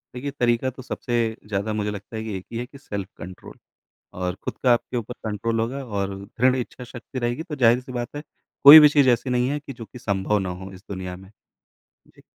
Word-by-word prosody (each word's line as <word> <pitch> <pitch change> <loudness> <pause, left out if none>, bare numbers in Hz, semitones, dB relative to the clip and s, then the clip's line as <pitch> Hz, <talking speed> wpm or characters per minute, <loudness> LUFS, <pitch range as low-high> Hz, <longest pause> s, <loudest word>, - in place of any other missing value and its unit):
देखिए, 140 +3 -4
तरीका 120 -1 +1
तो 130 0 -10
सबसे 120 0 -4 0.3
ज़्यादा 105 +1 -2
मुझे 105 -1 -1
लगता 100 +2 -8
है 110 - -3
कि 110 -3 -4
एक 95 - -10
ही 115 - -4
है 120 - -3
कि 140 +2 -15
सेल्फ 100 -9 -5
कंट्रोल। 90 +2 -10 0.6
और 90 0 -2
खुद - - -4
का 125 - +5
आपके 120 +1 -2
ऊपर 120 +1 -4
कंट्रोल 110 +2 -1
होगा 130 +5 -2
और 100 -4 -3
दृढ़ 125 +5 +2
इच्छा 125 0 -5
शक्ति 125 +1 -8
रहेगी, 120 +5 -2
तो 165 -3 -6
ज़ाहिर-सी 125 0 +3
बात 120 +2 -5
है, 145 - -5 0.4
कोई 145 +3 +13
भी 150 -1 +8
चीज़ 145 -3 +4
ऐसी 120 +2 +1
नहीं 125 0 +1
है 145 +1 -1
कि 140 -1 -9
जो 120 -2 -9
कि 125 - -13
संभव 100 -1 0
ना 95 -2 -3
हो 95 - -8
इस 95 +1 -13
दुनिया 95 -2 -5
में। 95 +1 -15 0.8
जी। - - -22
120 Hz, 230 wpm, -24 LUFS, 100-130 Hz, 0.8 s, कोई